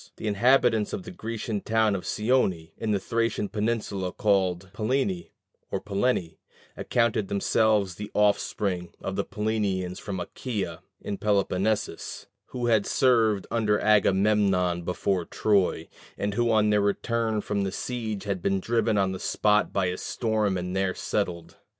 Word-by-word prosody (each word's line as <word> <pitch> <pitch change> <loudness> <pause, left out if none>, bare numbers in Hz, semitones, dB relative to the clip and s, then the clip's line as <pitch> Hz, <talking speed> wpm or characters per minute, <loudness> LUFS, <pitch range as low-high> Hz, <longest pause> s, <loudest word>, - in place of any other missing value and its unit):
The - - -7
inhabitants 115 +1 +3
of 200 - -3
the 185 - -8
Grecian 115 - -4
town 110 -2 +2
of 95 - -5
Scione, 105 -8 +1
in 110 - -4
the 105 - +3
Thracian 115 0 -1
peninsula 105 -3 -2
called 95 -3 +1
Pallene 105 -5 -1 0.4
or - - -2
Pellene, 100 -5 -1 0.4
accounted 115 -4 +1
themselves 100 -1 +2
the 105 +4 -7
offspring 100 -3 0
of 95 - -4
the 100 - 0
Pellenians 100 -5 -2
from 100 -3 -5
Achæa 95 -2 -4 0.2
in 100 - -4
Peloponnesus, 100 -2 -1 0.2
who 125 -1 -4
had 110 -4 +3
served 110 -6 +3
under 105 -3 +2
Agamemnon 100 -3 +3
before 90 +1 -1
Troy, 95 -3 +1 0.3
and 100 0 -1
who 120 +2 +1
on 105 -1 +3
their 105 0 +3
return 110 +2 0
from 100 -1 -1
the 95 - -2
siege 110 -1 -4
had 100 -3 -3
been 95 +2 +1
driven 115 0 +1
on 95 -1 +2
the 95 - -5
spot 105 0 +2
by 100 -2 +1
a 90 0 -1
storm 110 -4 -1
and 90 +1 -4
there 95 -1 0
settled. 90 -5 -3
105 Hz, 150 wpm, -26 LUFS, 95-110 Hz, 0.4 s, inhabitants